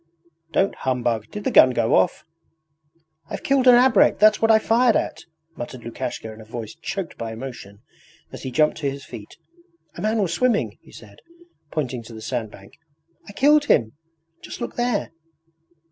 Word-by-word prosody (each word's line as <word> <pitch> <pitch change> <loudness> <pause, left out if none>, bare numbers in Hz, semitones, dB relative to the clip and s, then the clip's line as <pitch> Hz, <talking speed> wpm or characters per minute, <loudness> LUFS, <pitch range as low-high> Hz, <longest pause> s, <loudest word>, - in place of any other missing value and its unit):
'Don't 195 - +1
humbug! 120 -4 -1
Did 210 - -7
the - - -1
gun 130 - +7
go 115 -2 +1
off? 95 - +2 0.5
...' 155 +1 -41
'I've - - -6
killed 270 -1 +2
an 250 - +9
abrek, 245 -3 +4
that's 215 +1 +4
what 225 - +3
I 220 - +7
fired 230 +2 +3
at,' - - -2 0.3
muttered 120 0 -8
Lukashka 115 -1 -6
in 110 - -13
a - - -11
voice 110 0 -7
choked 175 +2 -6
by 115 -1 -4
emotion, 110 -4 -9 0.5
as - - -9
he 130 - -5
jumped 155 +4 +2
to 145 -3 -1
his 140 0 -8
feet. 105 -2 -11 0.6
'A - - -9
man 220 +1 0
was 185 -5 0
swimming...' 240 +2 0
he - - -19
said, - - -14 0.5
pointing 130 -6 -3
to 115 0 -12
the 110 - -9
sandbank. 110 -4 -6 0.5
'I - - -10
killed 290 +5 +4
him. 110 - +2 0.5
Just - - -9
look 240 - -5
there.' 240 -3 -1
150 Hz, 175 wpm, -22 LUFS, -, 0.6 s, an